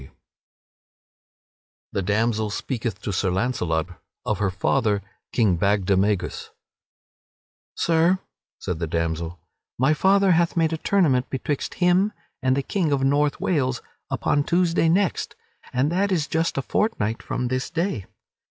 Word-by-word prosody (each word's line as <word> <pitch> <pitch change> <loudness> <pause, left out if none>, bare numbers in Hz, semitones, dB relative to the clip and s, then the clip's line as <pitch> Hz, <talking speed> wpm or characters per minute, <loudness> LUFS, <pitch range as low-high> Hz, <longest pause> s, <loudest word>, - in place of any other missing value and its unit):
[Sidenote: 65 - -16 1.7
The 100 - -1
damsel 110 +2 0
speaketh 110 -2 -4
to 100 - -2
Sir 95 +1 +1
Launcelot 90 -5 0 0.4
of 105 -3 -1
her 105 -2 +1
father, 105 +1 +1 0.3
King 100 -8 +2
Bagdemagus] 100 -1 +1 1.3
"Sir," 170 +3 +3 0.4
said 85 -3 -4
the 85 - -2
damsel, 85 +1 -2 0.4
"my 135 +5 +3
father 195 +4 +4
hath 170 0 +2
made 165 -1 +2
a - - -1
tournament 155 -9 +2
betwixt 135 +1 -3
him 185 +3 +3 0.3
and 130 +1 +2
the 140 - 0
King 170 0 0
of 135 -1 +1
North 145 +2 +2
Wales 130 -8 0 0.3
upon 145 - +1
Tuesday 170 0 +2
next, 190 +2 +1 0.4
and 135 +5 +1
that 195 +3 +1
is 165 -5 +1
just 165 0 -1
a 135 - 0
fortnight 115 - 0
from 125 -1 -3
this 130 0 -2
day. 165 - -2
130 Hz, 135 wpm, -24 LUFS, 100-165 Hz, 1.7 s, father